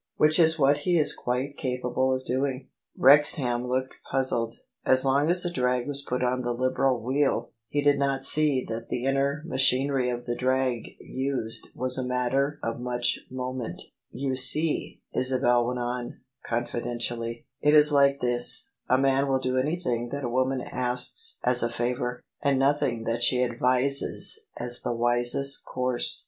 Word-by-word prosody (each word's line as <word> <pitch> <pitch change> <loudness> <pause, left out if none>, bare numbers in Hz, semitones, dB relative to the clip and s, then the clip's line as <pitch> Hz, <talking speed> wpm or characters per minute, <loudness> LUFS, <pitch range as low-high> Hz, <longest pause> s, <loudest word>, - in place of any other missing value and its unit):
Which 155 +3 +3
is 160 -1 +4
what 145 0 +3
he 175 +4 0
is 155 - +2
quite 130 +3 -3
capable 125 0 -1
of 130 0 -3
doing." 130 +1 -3 0.3
Wrexham 130 -3 +3
looked 130 +1 -2 0.2
puzzled. 120 -4 0 0.3
As 130 +1 +3
long 140 +3 +2
as 180 +1 +3
a 175 - -2
drag 125 -2 0
was 140 -1 +8
put 125 -2 -3
on 125 +1 0
the 120 -1 -2
Liberal 130 0 0
wheel, 130 -1 -1 0.2
he 145 - -1
did 145 -1 +3
not 135 -1 0
see 145 -3 +3
that 115 +1 -6
the 125 - -3
inner 140 +2 -1
machinery 135 -3 +1
of 120 0 -5
the 120 - -3
drag 130 -2 -1
used 130 -4 -2
was 130 +1 0
a - - -2
matter 125 +3 -1
of 115 +1 -3
much 120 -1 -1
moment 130 -2 -6 0.2
" - - -54
You 135 -1 -1
see," 150 +5 +5
Isabel 125 -2 +1
went 125 0 -3
on 120 0 -5 0.2
confidentially, 120 0 -4
" - - -54
it 150 +1 +3
is 150 0 +6
like 140 0 +3
this: 120 -1 0 0.2
a 130 - +4
man 135 +1 +1
will 135 -1 +1
do 130 0 -1
anything 130 -5 -2
that 140 +2 -5
a 120 - -2
woman 130 +1 -1
asks 125 - -2
as 125 0 +2
a 120 - 0
favour, 125 +1 -3 0.2
and 140 -1 +1
nothing 135 -4 0
that 115 +1 -3
she 125 +1 +4
advises 125 - 0 0.2
as 120 0 0
the 120 - -3
wisest 120 +3 0
course. 125 -1 +3
130 Hz, 170 wpm, -26 LUFS, 120-140 Hz, 0.3 s, was